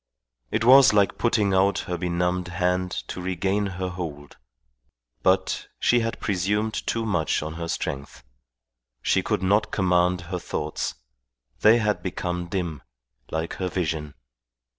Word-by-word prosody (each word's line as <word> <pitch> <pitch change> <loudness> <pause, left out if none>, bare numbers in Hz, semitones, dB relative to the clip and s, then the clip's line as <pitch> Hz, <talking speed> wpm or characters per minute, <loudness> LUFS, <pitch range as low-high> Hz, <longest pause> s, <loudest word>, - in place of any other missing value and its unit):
It - - 0
was 130 0 +8
like 100 -1 +2
putting 105 -4 +2
out 95 +1 +3
her 90 - -2
benumbed 90 +1 -1
hand 90 +1 0 0.2
to 90 - -5
regain 95 +3 0
her 95 -1 -4
hold. 80 -6 -7 0.8
But - - +1
she 120 - +4
had 115 0 -2
presumed 105 +3 0
too 115 0 0
much 85 -8 0
on 80 +1 -5
her 85 0 -5
strength. 70 -5 -4 0.8
She - - +3
could - - -1
not 100 +3 +2
command 90 -2 +2
her 90 +2 -4
thoughts; 75 -2 -3 0.6
they 110 +2 +6
had 105 -3 0
become 90 -1 -3
dim, 85 -6 -3 0.5
like 80 +1 -3
her 95 - -1
vision. 80 -5 -3
90 Hz, 140 wpm, -25 LUFS, 85-100 Hz, 0.8 s, was